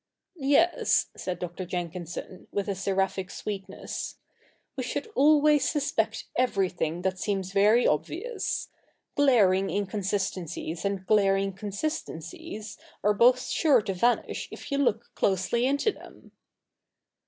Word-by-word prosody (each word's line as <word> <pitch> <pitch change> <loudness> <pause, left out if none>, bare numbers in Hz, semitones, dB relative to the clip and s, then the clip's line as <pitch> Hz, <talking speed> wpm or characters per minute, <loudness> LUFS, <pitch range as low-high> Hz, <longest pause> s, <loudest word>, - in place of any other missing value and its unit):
' - - -56 0.2
Yes,' 345 +3 +3
said 180 - -4
Dr. 180 +1 -5
Jenkinson, 175 +1 -6
with 200 0 -2
a 200 - 0
seraphic 190 0 -1
sweetness, 200 -2 -5 0.3
' - - -38
we - - -3
should - - -3
always 295 -3 +5
suspect 225 -7 -1
everything 185 -8 0
that 190 -1 -1
seems 195 -2 -2
very 210 +5 +5
obvious. 320 - -1 0.5
Glaring 200 -9 +4
inconsistencies 190 -4 -2
and 195 -1 -2
glaring 195 -1 +3
consistencies 205 - -5 0.2
are 210 - +4
both 245 +4 +5
sure 275 -9 +3
to 195 - -2
vanish 235 +7 0
if - - -10
you 280 - +1
look 235 -4 0
closely 200 +6 +1
into 285 +10 +2
them.' - - -15
200 Hz, 120 wpm, -27 LUFS, 185-245 Hz, 0.5 s, always